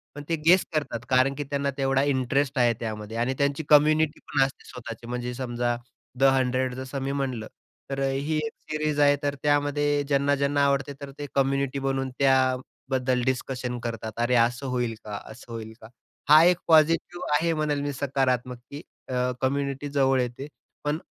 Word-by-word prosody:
पण 145 - -7
ते 165 - +2
गेस 180 +3 +6
करतात 145 -6 -1
कारण 130 +1 +4
की 145 - -3
त्यांना 140 0 0
तेवढा 135 0 +2
इंटरेस्ट 140 0 0
आहे 120 -1 +4
त्यामध्ये 110 -1 -5
आणि 120 +3 0
त्यांची 140 +2 0
कम्युनिटी 155 +1 +4
पण 140 - -1
असते 135 - -9
स्वतःची, 120 -1 -8
म्हणजे 125 0 -3
समजा 120 -1 -2 0.4
'द - - +2
हंड्रेड' 130 -1 +1
जसं 130 +1 -5
मी 135 +1 -2
म्हटलं, 130 -5 -3 0.4
तर 135 0 -3
ही 135 +3 0
एक 150 - -4 0.2
सीरीज 155 -1 -1
आहे, 145 0 +5
तर 145 0 0
त्यामध्ये 145 0 +2
ज्यांना-ज्यांना 140 0 +2
आवडते, 140 0 0
तर 140 -1 -7
ते 145 - -4
कम्युनिटी 140 0 +1
बनून 135 -1 -1
त्याबद्दल 130 -1 +1
डिस्कशन 125 -1 -2
करतात, 115 -2 -4
अरे 120 +1 +2
असं 120 +3 +2
होईल 125 -3 -1
का, 105 -1 -5
असं 120 +1 -13
होईल 110 -1 -6
का 110 - -11 0.4
हा, 155 +2 +9
एक 180 0 +5
पॉझिटिव्ह 165 +1 +3
आहे 165 +2 +2
म्हणेल 155 -2 0
मी 145 0 -2
सकारात्मक 130 -2 -1
की 145 +1 -7 0.3
अ, 125 0 0
कम्युनिटी 140 +1 -1
जवळ 135 -2 +2
येते. 125 +3 -4 0.4
पण 150 +1 0
135 Hz, 170 wpm, -26 LUFS, 125-145 Hz, 0.4 s, हा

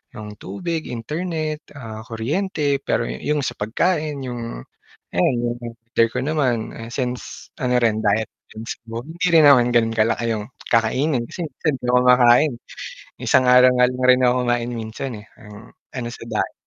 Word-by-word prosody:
yung 105 -1 -8
tubig, 160 - -4
internet, 155 +5 -4
ah, 110 -5 -8
kuryente, 145 - -1
pero - - 0
yu - - -4 0.2
yung 150 - 0
sa - - -4
pagkain 150 - -1
yung 115 - -6 0.6
ayan 120 +8 +3
yung 120 0 -2
mother 115 0 -1
ko - - -1
naman 130 -6 0 0.2
since 125 -2 -5
ano 125 -1 +2
rin 110 -2 +2
diet 110 +1 +2 0.3
rin 110 +1 -8
siguro 115 +1 -7
hindi 175 +3 -2
rin 160 -2 +7
naman 125 -4 +6
gano'n 115 -1 +3
kalaki 115 +1 +1
yung 105 -1 -4 0.3
kakainin 120 +3 +2
kasi 175 - -5
minsan 150 +2 -2
hindi 125 - -8
ako 125 0 +5
kumakain. 125 +3 +5 0.7
Minsan - - +3
na 125 - +5 0.2
nga 125 0 +4
lang 125 0 -5
rin 125 0 +4
ako 125 0 +4
kumain 120 0 0
minsan, 115 +3 -5
eh, - - -20
parang 105 0 -13 0.3
ano 120 -2 -3
sa - - -9
diet. - - -2
125 Hz, 170 wpm, -21 LUFS, 115-145 Hz, 0.7 s, rin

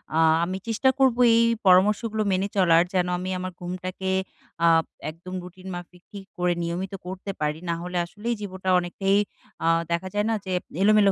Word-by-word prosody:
আ - - +2 0.3
আমি 185 +2 -2
চেষ্টা 230 +4 +2
করব 265 -3 +4 0.2
এই 230 - +5 0.3
পরামর্শগুলো 210 +4 +4
মেনে 190 +2 +1
চলার। 170 -2 +5
যেন 180 -1 +2
আমি 185 - -4
আমার 185 0 -4
ঘুমটাকে 185 +1 -4 0.6
আ - - +6 0.4
একদম 175 +3 -11
রুটিন 185 +1 -12
মাফিক 175 0 -10
ঠিক 200 -2 -9
করে 180 0 +2
নিয়মিত 180 +3 -3
করতে 190 +2 -5
পারি। 150 +1 -1
নাহলে 175 +2 -3
আসলেই 220 +6 -4
জীবটা 190 -2 -4
অনেকটাই 195 +3 0 0.5
আ - - +3 0.2
দেখা 170 +2 -1
যায় 205 0 +1
না 225 - +2
যে 185 - -4 0.3
এলোমেলো 210 -1 +5
185 Hz, 165 wpm, -25 LUFS, 180-200 Hz, 0.6 s, আ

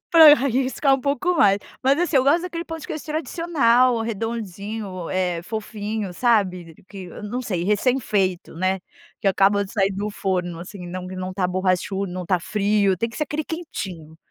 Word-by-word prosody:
pra 320 -3 +10
eu 295 - +8
arriscar 270 +1 +1
pouco 285 +6 0
mais. 200 -4 +5 0.3
Mas 275 +2 +4
assim 350 -4 +1
eu 260 - +4
gosto 320 +5 +4
daquele 340 -2 -4
ponto 325 -2 -7
que - - -9
eu 310 - -3
acho - - -9
tradicional, 270 -6 +2
redondinho, 210 -4 -4
eh 180 -2 -1
fofinho, 215 -1 -4
sabe 185 -7 +1
que 195 -3 -8 0.2
não 235 +5 -3
sei, 185 -8 -2
recém 225 +7 +2
feito, 190 -6 -1
né? 185 +2 0 0.4
Que 200 - +2
acaba 200 +1 +3
de 195 - -11
sair 195 -3 +1
do 205 +2 -3
forno 180 -4 -2
assim, 180 +1 -9
não 180 +1 -6
que 185 - -7
não 185 0 -4
está 185 -1 0
borrachudo, 185 +1 -1
não 185 0 -4
está 180 0 0
frio. 200 0 +1
Tem 230 +6 -1
que 230 - -11
ser 305 - -1
aquele 300 +1 -2
quentinho. 190 - -6
205 Hz, 190 wpm, -23 LUFS, 185-260 Hz, 0.4 s, pra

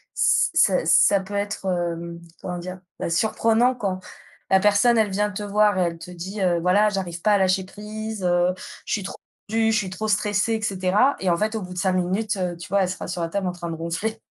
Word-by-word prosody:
ç - - +3
ça - - +3
ça 200 - +5
peut 190 +2 -9
être, 205 0 -3
hem, 170 -2 -3 0.2
comment 180 -1 -4
dire? 185 +1 -7 0.2
Bah, - - -2
surprenant 225 +7 +2
quand 195 -6 -2 0.5
la 190 - +5
personne 210 +4 +4
elle 215 -2 +3
vient 210 +2 0
te 205 +1 -5
voir 205 -1 +2
et - - +2
elle 170 -1 -2
te 180 - -10
dit: 185 +4 -7
«Heu, 175 -2 +2
voilà 190 +5 +4
j'arrive 180 -4 -4
pas 210 - +3
à - - +5
lâcher 190 0 +2
prise, 215 +1 -7
heu, 175 0 +2 0.3
je - - -6
suis 205 - -1
trop 195 - -7 0.3
tendue, 225 +1 +2
je - - +3
suis 195 -3 -1
trop 190 +4 -4
stressée 210 +1 +1
et 220 - -1
cetera» 200 +6 +2
et 190 - 0
en 170 - +3
fait 215 +4 -1
au 220 - -2
bout 180 -1 -7
de - - -10
5 190 0 +1
minutes, 195 +4 -1
heu, 180 -2 -2
tu 170 - -10
vois 200 +1 +2
elle 180 - -1
sera 185 - -5
sur 180 -1 -3
la 165 - -2
table 195 +1 -2
en - - 0
train 175 -1 -7
de 165 - -4
ronfler. 170 +7 -3
195 Hz, 245 wpm, -23 LUFS, 180-210 Hz, 0.5 s, ça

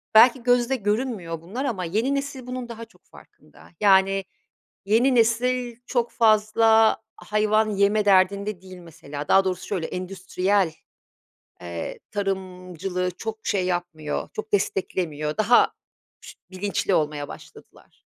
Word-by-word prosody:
belki 240 +2 +7
gözde 245 +1 +2
görünmüyor 205 -7 -2
bunlar 230 +12 -5
ama 195 -8 -2
yeni 225 +11 0
nesil 275 -2 -5
bunun 250 -1 -5
daha 230 0 -8
çok - - -27
farkında. - - -19
Yani, 195 -1 +4 0.6
yeni 240 +6 +3
nesil 240 +1 +1
çok 240 -2 -1
fazla 220 0 +4 0.2
hayvan 215 +1 +1
yeme 205 +1 +2
derdinde 200 0 +2
değil 185 -1 -12
mesela. 150 -4 -9
Daha 195 - +5
doğrusu 185 -1 -3
şöyle 180 -6 -2
endüstriyel, 185 0 -1 0.9
eee, 85 -1 -6
tarımcılığı 185 -2 -3
çok 220 +4 -7
şey 190 -3 +1
yapmıyor, 175 -4 -3
çok 215 0 -6
desteklemiyor. 170 -5 -1
Daha 220 +3 +4 0.5
ş - - -12 0.2
bilinçli 195 0 -1
olmaya 150 -2 -1
başladılar. - - -15
200 Hz, 120 wpm, -24 LUFS, 180-225 Hz, 0.9 s, belki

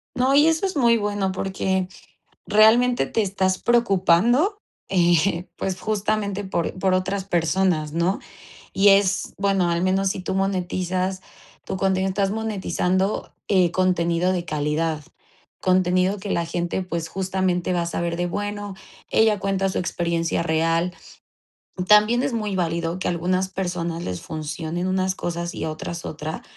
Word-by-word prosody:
No, 260 +2 +2
y 295 +2 +6
eso 325 +3 +2
es 380 - -2
muy 235 -4 +4
bueno, 205 -2 -1
porque 190 -1 -1 0.6
realmente 235 +4 +4
te 225 - 0
estás 190 -1 0
preocupando, 235 - +3 0.3
eh, 175 0 +2
pues, 185 -1 -3
justamente 205 -1 -1
por 180 -2 -2
por 190 -1 +2
otras 190 +1 -1
personas, 170 -3 0
¿no? 170 +4 0 0.5
Y 200 +1 +5
es 195 -1 +3
bueno, 195 -3 +1
al 170 0 0
menos 190 +1 +2
si 190 - -3
tú 185 - -3
monetizas 185 -1 -1 0.4
tu - - -4
contenido, 190 0 +1
estás 195 0 0
monetizando, 200 -3 -1
eh, 185 -4 +3
contenido 180 -1 +1
de 175 -2 -2
calidad, 155 +1 -1 0.6
contenido 185 +1 +2
que 200 +1 -6
la 170 - 0
gente, 175 +2 -2
pues, 170 -2 -4
justamente, 185 -1 -1
va 175 - +1
a - - -1
saber 170 0 -2
de: 175 0 -1
"Bueno, 205 +2 -4 0.3
ella 220 -2 +3
cuenta 195 0 0
su 190 - -2
experiencia 170 -2 -1
real". 165 +2 +1 0.9
También 210 +3 +5
es 275 - -1
muy 210 -3 -2
válido 170 0 -1
que - - -2
a - - +1
algunas 185 +2 0
personas 175 -3 -3
les 90 -1 -4
funcionen 160 +3 -4
unas 185 0 0
cosas 170 +1 -4
y - - -4
a 160 - -2
otras 165 +2 -6
otra, 155 +1 -5
185 Hz, 150 wpm, -23 LUFS, 170-200 Hz, 0.9 s, y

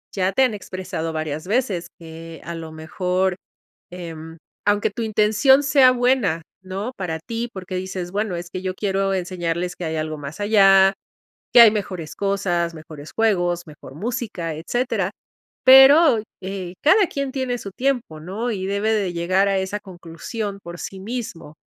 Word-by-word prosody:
ya 190 -1 0
te 265 - +4
han 250 -4 +2
expresado 185 -4 -5
varias 155 +1 -4
veces 200 -6 0
que 165 0 -10
a 170 - -6
lo 165 -1 -7
mejor, 180 +4 -1 0.5
em, 165 -2 -8 0.3
aunque 205 0 +2
tu 230 - -6
intención 220 +6 +4
sea 270 -2 +6
buena, 245 -10 +1 0.2
¿no?, 195 +5 -4
para 165 -4 -3
ti, 230 +7 -4
porque 185 -1 -6
dices, 185 -1 -4
bueno, 205 -1 -1
es 175 0 -6
que 185 - -5
yo 185 0 -3
quiero 195 -1 0
enseñarles 175 -1 -2
que 175 - -5
hay 160 0 -2
algo 155 0 -3
más 145 +3 -8
allá, 195 -2 +6 0.6
que 240 - +10
hay 225 -2 +9
mejores 185 -6 -4
cosas, 185 -4 0
mejores 155 -1 -11
juegos, 175 -6 +1
mejor 150 -3 -12
música, 210 - -4
etcétera, 245 - -1 0.5
pero, 265 0 +8 0.2
eh, 185 -2 -5
cada 380 +6 +5
quien 275 -3 -3
tiene 260 -2 -2
su 200 - -7
tiempo, 245 - -2
¿no? 210 +9 -3
Y 190 -3 -3
debe 200 +2 0
de 200 -5 0
llegar 185 +3 +1
a 195 - +1
esa 190 +2 -3
conclusión 195 +3 -7
por 170 0 -8
sí 190 - -7
mismo. 195 -8 -6
190 Hz, 165 wpm, -22 LUFS, 170-220 Hz, 0.6 s, que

